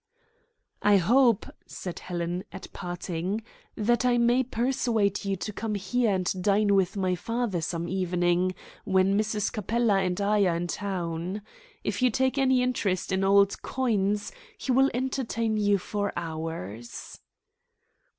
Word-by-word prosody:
"I 205 -1 +5
hope," 235 +4 +4 0.2
said 180 -2 -6
Helen, 175 0 -3
at - - -10
parting, 180 +3 -4 0.3
"that 235 +2 +1
I 245 -1 +3
may 240 +2 +4
persuade 235 -5 0
you 195 0 0
to 210 +3 -5
come 215 +1 -3
here 215 +5 0
and 185 -1 0
dine 205 +1 +3
with 195 0 +2
my 185 -2 +1
father 225 0 -2
some 170 +1 -3
evening 180 0 +1 0.3
when 190 -1 +3
Mrs. 210 -1 0
Capella 220 0 +1
and 180 0 -1
I 205 0 +3
are 170 - +1
in 170 +1 -2
town. 180 0 -3 0.4
If - - -2
you 255 - +5
take 260 +3 +1
any 260 -2 +3
interest 200 -8 -1
in 190 0 +1
old 200 0 +4
coins 210 -5 0 0.3
he 265 - -2
will 270 +2 +5
entertain 235 -3 -1
you 205 -1 +3
for 205 +2 -2
hours." 160 - -6
200 Hz, 140 wpm, -27 LUFS, 180-230 Hz, 0.4 s, I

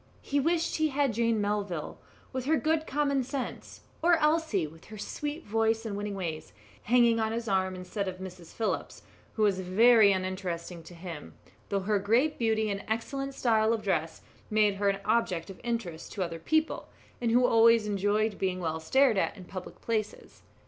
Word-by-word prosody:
He 285 - 0
wished 330 +3 +1
he 315 -1 +2
had 290 -1 -5
had 275 -5 +2
Jane 230 0 +1
Melville, 205 -6 -2 0.3
with 255 -1 -3
her 315 +3 +3
good 315 0 0
common 280 -1 +1
sense, 265 0 -6 0.2
or 345 +1 +5
Elsie, 305 - +2
with 160 +2 -13
her 215 - -10
sweet 295 - -5
voice 225 +1 +1
and 210 -3 -3
winning 205 0 -4
ways, 165 -5 -5 0.3
hanging 235 -1 +4
on 220 0 0
his 230 0 -3
arm 190 -2 +1
instead 190 +2 -4
of 185 -1 -4
Mrs. 180 -2 -9
Phillips, 225 - -3 0.3
who 220 - 0
was 200 -3 +3
very 210 +3 +6
uninteresting 185 -2 -3
to 175 - -12
him, 170 -3 -8 0.3
though 200 -1 0
her 205 +1 +1
great 235 +10 +2
beauty 220 -2 +1
and 200 0 -4
excellent 270 +5 -3
style 225 -3 +2
of 220 -1 -3
dress 165 -5 -1 0.3
made 215 -1 +3
her 200 0 +2
an 195 0 -1
object 185 -7 0
of 190 - -13
interest 230 -9 -4
to 195 - -1
other 165 -1 -5
people, 315 - 0 0.3
and 235 - +1
who 245 +2 +4
always 230 -1 +5
enjoyed 205 +1 0
being 185 -1 -1
well 160 -2 -2
stared 245 +6 +3
at 205 - -1
in 185 - -10
public 185 0 -9
places. 220 -2 -3
215 Hz, 185 wpm, -29 LUFS, 190-240 Hz, 0.3 s, very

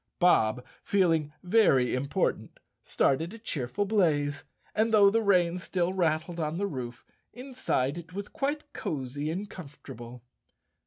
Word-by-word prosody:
Bob, 125 - +3 0.2
feeling 165 -6 +2
very 180 - +4
important, 140 +2 -1 0.2
started 165 +9 0
a - - -9
cheerful 200 - -3
blaze, 150 -9 +1 0.3
and 220 +1 +1
though 205 -2 +6
the 225 +2 +2
rain 180 -4 +3
still 180 0 -1
rattled 170 -1 0
on 155 +1 -2
the 200 - 0
roof, 125 -8 -6 0.3
inside 245 - -2
it 170 0 -12
was 200 +2 -5
quite 290 +2 -3
cozy 145 +1 -3
and 195 +5 -4
comfortable. 125 -7 -10
170 Hz, 130 wpm, -28 LUFS, 140-200 Hz, 0.3 s, though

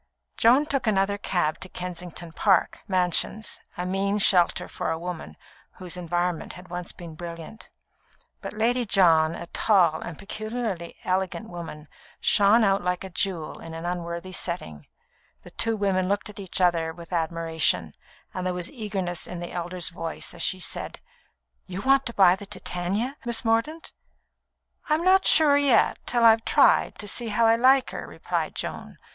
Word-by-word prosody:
Joan 250 +6 +5
took 275 -5 -2
another 200 -1 +1
cab 175 -6 0
to 185 - -6
Kensington 180 -2 -6
Park 190 +1 +2
Mansions 185 +3 +1 0.2
a 180 - -3
mean 195 +2 0
shelter 180 -4 +3
for - - -4
a 160 - -1
woman 165 - -7 0.4
whose 180 -1 -7
environment 175 -1 -2
had 180 +1 -12
once 175 0 -5
been 170 -2 -10
brilliant. 170 +5 -9 0.7
But - - -6
Lady 240 +4 +1
John, 170 -6 +4
a 170 - -7
tall 175 -4 +2
and 170 -3 -7
peculiarly 215 -4 -4
elegant 190 +4 -2
woman, 165 -3 -8 0.3
shone 210 +3 +4
out 195 -2 +2
like 180 +1 -1
a 190 - -8
jewel 175 -3 -2
in 165 0 -8
an 165 +1 -6
unworthy 175 +1 -4
setting. 170 - -4 0.6
The - - -13
two 225 -1 -1
women 190 -2 0
looked 205 +1 -1
at 205 - -13
each 190 -1 -3
other 170 -3 +2
with 170 +1 -11
admiration, 165 -1 0 0.4
and 185 - -4
there 180 - -1
was 180 -1 -3
eagerness 195 - -3
in 180 - -6
the 175 - -6
elder's 175 0 -3
voice 165 -1 -5
as - - -9
she 185 - +1
said: - - -3 0.7
"You 185 +1 -6
want 270 0 +3
to 235 - -4
buy 185 -2 +6
the 200 +1 -10
Titania, 200 +11 -3
Miss 235 -1 -2
Mordaunt?" 230 +9 0 1.0
"I'm 310 +2 +2
not 380 +1 +5
sure 295 -3 +6
yet, 280 -4 +3
till 240 -1 +3
I've 225 0 +6
tried, - - +4
to 205 - -7
see 235 +3 -1
how 225 +2 +2
I 225 0 +5
like 260 +2 +4
her," - - -6
replied - - -3
Joan. - - -5
185 Hz, 165 wpm, -25 LUFS, 170-220 Hz, 1.0 s, buy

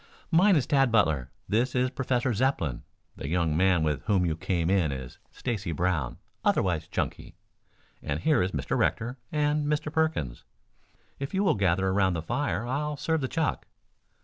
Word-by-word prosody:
"Mine 185 +4 +5
is 145 - +2
Tad 135 -3 +3
Butler. 80 - +2 0.2
This 120 +4 +1
is 125 0 +2
Professor 125 -2 0
Zepplin. 100 - 0 0.4
The - - -5
young 85 -1 +1
man 90 -1 +3
with 75 -4 0
whom 95 -4 +2
you 80 -2 0
came 85 0 -1
in 90 -7 +2
is 65 -2 -7
Stacy 105 -9 -3
Brown, 80 -6 -1 0.3
otherwise 85 -4 +1
Chunky, - - -4 0.7
and 70 +2 -2
here 150 - +3
are 90 - +2
Mr. 75 -8 -2
Rector 120 +3 0
and 150 0 +1
Mr. 150 +1 -1
Perkins. 160 - -1 0.8
If 140 +7 -4
you 195 - +2
will 195 - +4
gather 95 -1 +1
around 95 -1 +2
the 80 - -3
fire 90 +5 -1
I'll 145 +4 -2
serve 160 +2 0
the 130 - -1
chuck." 160 +3 -1
100 Hz, 170 wpm, -28 LUFS, 85-140 Hz, 0.8 s, Mine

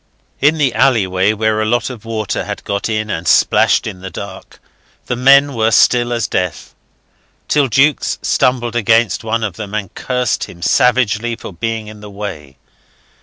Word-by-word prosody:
In 150 +3 +3
the 140 -5 +1
alleyway, 100 -7 +2
where 110 0 0
a - - 0
lot 120 +3 0
of 115 -3 -11
water 110 -3 -3
had - - -6
got 100 +2 -3
in 110 -1 -2
and 80 -1 -4
splashed - - +3
in 95 - -6
the 95 +1 -7
dark, - - -9 0.5
the 125 - -2
men 140 +3 +5
were 110 -2 +1
still 120 +2 +3
as 115 -3 -1
death, 90 -4 -3 0.7
till 145 -2 +2
Jukes 135 +5 +2
stumbled 120 -2 0
against 115 -3 +2
one 115 +1 -1
of 100 -4 -4
them 105 -1 -6
and 100 -4 -4
cursed 125 -5 -2
him 85 -1 -12
savagely 120 -1 +2
for 100 - -10
being 115 +4 -3
in 105 0 -11
the 105 0 -10
way. 95 -10 -8
110 Hz, 170 wpm, -16 LUFS, 100-125 Hz, 0.7 s, men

